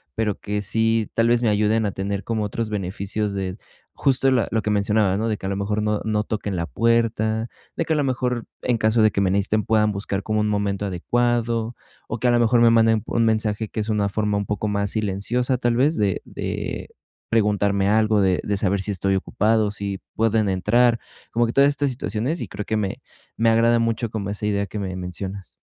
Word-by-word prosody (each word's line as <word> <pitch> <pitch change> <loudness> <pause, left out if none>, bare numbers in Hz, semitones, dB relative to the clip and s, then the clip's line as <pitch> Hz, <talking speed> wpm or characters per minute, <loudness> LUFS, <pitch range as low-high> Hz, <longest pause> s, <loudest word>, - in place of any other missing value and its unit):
pero 110 -3 -1
que 105 0 -3
sí 110 +1 +1
tal 115 0 +2
vez 120 0 +3
me 115 - +3
ayuden 105 +1 +2
a 100 - 0
tener 100 +1 -3
como 110 -2 -1
otros 110 +2 -3
beneficios 100 +1 -3
de 95 -1 -3 0.4
justo 135 -1 +2
la 125 -3 +2
lo 110 - +1
que 105 - -1
mencionaba, 105 -1 +2
¿no? 110 +2 -1
De 110 -2 -1
que - - -9
a - - -1
lo 100 - -1
mejor 105 +1 -1
no 105 -1 0
no 105 -1 0
toquen 105 -2 -3
la 85 -1 -1
puerta, 110 - +1 0.3
de 165 - -1
que 160 - 0
a - - +1
lo 145 - +2
mejor, 125 -2 -1 0.2
en 120 -2 +1
caso 110 +1 +2
de 110 0 +5
que - - -1
me 95 - +2
necesiten, 100 +2 +1
puedan 105 0 +2
buscar 100 -1 -3
como 110 0 0
un 105 - +1
momento 100 -1 -1
adecuado, 115 +4 0 0.3
o 110 - -3
que 125 - +1
a - - +4
lo 120 - +3
mejor 120 0 +4
me 120 - +7
manden 110 -2 +4
un 115 -1 +1
mensaje 110 -1 0
que 110 - -5
es 105 - -4
una 105 -2 +1
forma 105 0 0
un 100 - -2
poco 105 +1 -2
más 100 -1 -1
silenciosa, 110 +5 -1
tal 120 -1 +1
vez, 140 +6 +2
de 100 -3 0
de - - -4 0.4
preguntarme 100 -3 +2
algo, 110 0 +3
de 95 -2 +2
de 100 -1 -1
saber 100 -1 0
si 105 - -3
estoy 95 0 0
ocupado, 105 +2 +1
si 100 -2 -4 0.2
pueden 110 -2 +2
entrar, 115 +5 +3 0.3
como 120 +1 +2
que 115 - -3
todas 140 0 +5
estas 145 0 0
situaciones 125 +5 -2
y - - -4
creo 105 - -6
que 110 - -1
me 100 -3 -3 0.4
me 115 0 +3
agrada 115 +1 +4
mucho 115 0 0
como 105 -2 -4
esa 105 +1 -4
idea 100 -1 0
que 105 - -6
me 95 -2 -4
mencionas. 95 +2 -6
110 Hz, 225 wpm, -23 LUFS, 100-115 Hz, 0.4 s, me